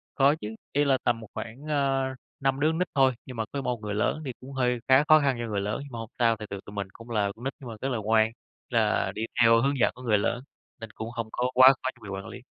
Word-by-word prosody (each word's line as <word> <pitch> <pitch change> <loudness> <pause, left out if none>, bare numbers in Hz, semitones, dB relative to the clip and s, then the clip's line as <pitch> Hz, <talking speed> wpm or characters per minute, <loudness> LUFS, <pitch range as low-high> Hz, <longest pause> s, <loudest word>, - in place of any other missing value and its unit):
Có 140 +1 +5
chứ, 105 +1 -6 0.2
ý 145 +1 +3
là 135 -2 +3
tầm 120 -1 +1
một 110 - -9
khoảng, 120 +6 -7
à, 135 -2 +1 0.3
5 135 0 +1
đứa 150 - +4
con 160 - -2
nít 180 - 0
thôi, 135 -1 +5
nhưng 130 - -8
mà 110 - -1
có 140 - -3
1 125 -3 -2
người 105 -1 -4
lớn, 130 +8 0
thì 130 - -3
cũng 130 +2 -10
hơi 125 -2 +1
khá 130 +2 +6
khó 155 0 +8
khăn 140 -3 +1
cho 120 - -2
người 105 -2 -2
lớn, 105 +2 -2
nhưng 140 -2 -11
mà 115 - -5
hông 115 0 -7
sao, 115 -2 +3
tại 105 0 -8
vì 100 - -4
tụi 100 - -10
mình 100 -1 -3
cũng 115 +1 -13
là 105 -3 +1
con 120 - -11
nít 135 - -1
mà 120 -4 -7
rất 135 - 0
là 125 -4 -1
ngoan, 110 +1 +3 0.4
là - - +1
đi 110 - -4 0.2
theo 115 0 +6
hướng 140 +1 +1
dẫn - - +4
của 125 - -12
người 110 -4 +3
lớn, 120 +4 -1 0.4
nên 115 -1 -8
cũng 110 +2 -6
hông 115 -2 -4
có 125 +1 0
quá 130 +1 +9
khó 130 0 -3
cho 120 - -24
người 100 - -8
quản 95 0 -5
lý. - - -8
125 Hz, 295 wpm, -27 LUFS, 110-135 Hz, 0.4 s, quá